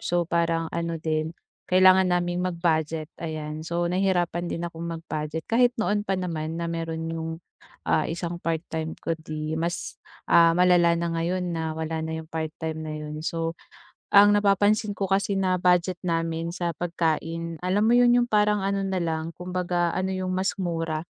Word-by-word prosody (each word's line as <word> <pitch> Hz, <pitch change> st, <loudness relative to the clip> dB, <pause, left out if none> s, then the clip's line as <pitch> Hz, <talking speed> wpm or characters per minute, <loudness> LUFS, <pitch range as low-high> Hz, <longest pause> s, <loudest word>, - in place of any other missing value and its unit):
So 175 Hz, 0 st, 0 dB
parang 165 Hz, -1 st, 0 dB
ano 170 Hz, 0 st, -2 dB
din, 160 Hz, +1 st, -2 dB, 0.3 s
kailangan 185 Hz, 0 st, +6 dB
naming 175 Hz, 0 st, 0 dB
mag-budget, 165 Hz, -3 st, -1 dB
ayan. 155 Hz, -1 st, -4 dB
So 170 Hz, +2 st, -2 dB
nahirapan 175 Hz, -1 st, 0 dB
din 170 Hz, 0 st, -3 dB
akong 170 Hz, -1 st, -6 dB
mag-budget. 160 Hz, -1 st, -4 dB
Kahit 245 Hz, +1 st, +3 dB
noon 205 Hz, -2 st, 0 dB
pa 195 Hz, -, +1 dB
naman 165 Hz, -3 st, -3 dB
na 170 Hz, 0 st, -3 dB
mayro'n 165 Hz, -1 st, -3 dB
'yong, 165 Hz, 0 st, -3 dB, 0.5 s
ah, -, -, +1 dB
isang 170 Hz, +1 st, -4 dB
part 165 Hz, 0 st, -2 dB
time 160 Hz, 0 st, -3 dB
ko, 165 Hz, -, -3 dB
'di 155 Hz, 0 st, -4 dB
mas, 170 Hz, +1 st, -3 dB, 0.2 s
ah, 165 Hz, 0 st, +5 dB
malala 175 Hz, -2 st, +5 dB
na 170 Hz, 0 st, -1 dB
ngayon 175 Hz, +2 st, -1 dB
na 160 Hz, -1 st, -3 dB
wala 160 Hz, 0 st, -2 dB
na 160 Hz, 0 st, -3 dB
'yong 160 Hz, 0 st, -8 dB
part 160 Hz, -1 st, -2 dB
time 160 Hz, 0 st, -4 dB
na 155 Hz, -1 st, -4 dB
'yon. 150 Hz, 0 st, -6 dB
So 165 Hz, 0 st, -2 dB, 0.6 s
ang 205 Hz, +1 st, +7 dB
napapansin 205 Hz, +1 st, +2 dB
ko 195 Hz, -, -1 dB
kasi 195 Hz, +1 st, +1 dB
na 185 Hz, -2 st, +1 dB
budget 180 Hz, 0 st, +2 dB
namin 165 Hz, -1 st, -1 dB
sa 175 Hz, 0 st, -2 dB
pagkain, 165 Hz, -1 st, -2 dB
alam 190 Hz, +4 st, +1 dB
mo 230 Hz, -, +4 dB
'yon, 245 Hz, 0 st, +6 dB
'yong 245 Hz, 0 st, +2 dB
parang 210 Hz, -2 st, +2 dB
ano 195 Hz, 0 st, 0 dB
na 190 Hz, -1 st, -1 dB
lang 160 Hz, -1 st, -3 dB
kumbaga 180 Hz, -1 st, -1 dB
ano 185 Hz, 0 st, -1 dB
'yong 185 Hz, 0 st, -2 dB
mas 185 Hz, +1 st, 0 dB
mura. 165 Hz, -3 st, -2 dB
170 Hz, 175 wpm, -25 LUFS, 160-185 Hz, 0.6 s, ang